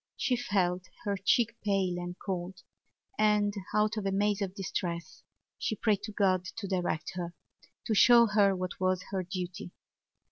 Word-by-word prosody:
She 260 Hz, -2 st, +1 dB
felt 190 Hz, -7 st, 0 dB, 0.2 s
her 200 Hz, -1 st, 0 dB
cheek 230 Hz, +4 st, +2 dB
pale 190 Hz, -4 st, +1 dB
and 175 Hz, 0 st, -5 dB
cold 185 Hz, -1 st, -5 dB, 0.6 s
and, 210 Hz, -1 st, +3 dB, 0.2 s
out 215 Hz, +1 st, +2 dB
of 210 Hz, -, -2 dB
a -, -, +1 dB
maze 205 Hz, +1 st, +1 dB
of 195 Hz, -1 st, -3 dB
distress, 170 Hz, -4 st, -4 dB, 0.4 s
she 220 Hz, -, -1 dB
prayed 205 Hz, -1 st, +1 dB
to 215 Hz, -, -6 dB
God 190 Hz, -3 st, +2 dB
to 210 Hz, -3 st, -4 dB
direct 180 Hz, -4 st, -1 dB
her, 175 Hz, -1 st, -5 dB, 0.5 s
to 220 Hz, -, 0 dB
show 235 Hz, +3 st, +7 dB
her 205 Hz, -3 st, +3 dB
what 185 Hz, 0 st, -4 dB
was 185 Hz, -1 st, +1 dB
her 190 Hz, -2 st, 0 dB
duty. 180 Hz, +1 st, -5 dB
195 Hz, 165 wpm, -30 LUFS, 180-210 Hz, 0.6 s, show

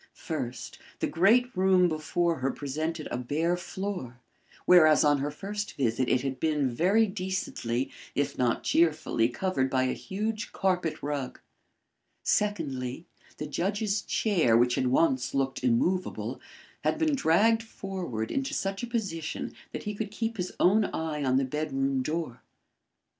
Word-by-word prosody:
First, 130 Hz, -7 st, -5 dB, 0.2 s
the -, -, -1 dB
great 240 Hz, +8 st, +3 dB
room 185 Hz, -1 st, +4 dB
before 165 Hz, +1 st, 0 dB
her 130 Hz, +1 st, 0 dB
presented 155 Hz, +4 st, -3 dB
a 120 Hz, -, -2 dB
bare 155 Hz, +8 st, 0 dB
floor, 180 Hz, -8 st, -5 dB, 0.5 s
whereas 155 Hz, -4 st, +7 dB
on 145 Hz, -1 st, +4 dB
her 140 Hz, +2 st, -1 dB
first 205 Hz, +7 st, -5 dB
visit 125 Hz, -1 st, +1 dB
it 125 Hz, -, +3 dB
had 135 Hz, -1 st, -3 dB
been 150 Hz, -5 st, +1 dB
very 190 Hz, -, +3 dB
decently, 185 Hz, -, -3 dB, 0.2 s
if 145 Hz, -, 0 dB
not 120 Hz, -2 st, +1 dB
cheerfully, 155 Hz, -8 st, +2 dB
covered 135 Hz, -3 st, 0 dB
by 130 Hz, -1 st, +2 dB
a 130 Hz, -, 0 dB
huge 215 Hz, +2 st, -4 dB
carpet 180 Hz, -4 st, 0 dB
rug. 145 Hz, -3 st, -3 dB, 0.8 s
Secondly, 155 Hz, -9 st, -1 dB, 0.3 s
the 150 Hz, -, -4 dB
judge's 200 Hz, +6 st, -1 dB
chair, 170 Hz, -, +2 dB
which 120 Hz, +1 st, +3 dB
had 130 Hz, -, +1 dB
once 130 Hz, -1 st, +2 dB
looked 135 Hz, -1 st, -1 dB
immovable, 175 Hz, +10 st, 0 dB, 0.4 s
had -, -, +1 dB
been 315 Hz, -1 st, +2 dB
dragged 225 Hz, -, +3 dB
forward 185 Hz, -, -5 dB
into 270 Hz, 0 st, -1 dB
such 195 Hz, 0 st, -2 dB
a 240 Hz, -, -3 dB
position 195 Hz, -10 st, -3 dB, 0.2 s
that -, -, -5 dB
he 210 Hz, -, -3 dB
could 210 Hz, 0 st, -4 dB
keep 225 Hz, +2 st, -3 dB
his 180 Hz, -1 st, -3 dB
own 205 Hz, +4 st, +4 dB
eye 155 Hz, -4 st, -3 dB
on 130 Hz, -1 st, +2 dB
the 135 Hz, -, +2 dB
bedroom 135 Hz, -1 st, -1 dB
door. 155 Hz, -2 st, -3 dB
160 Hz, 145 wpm, -28 LUFS, 135-195 Hz, 0.8 s, whereas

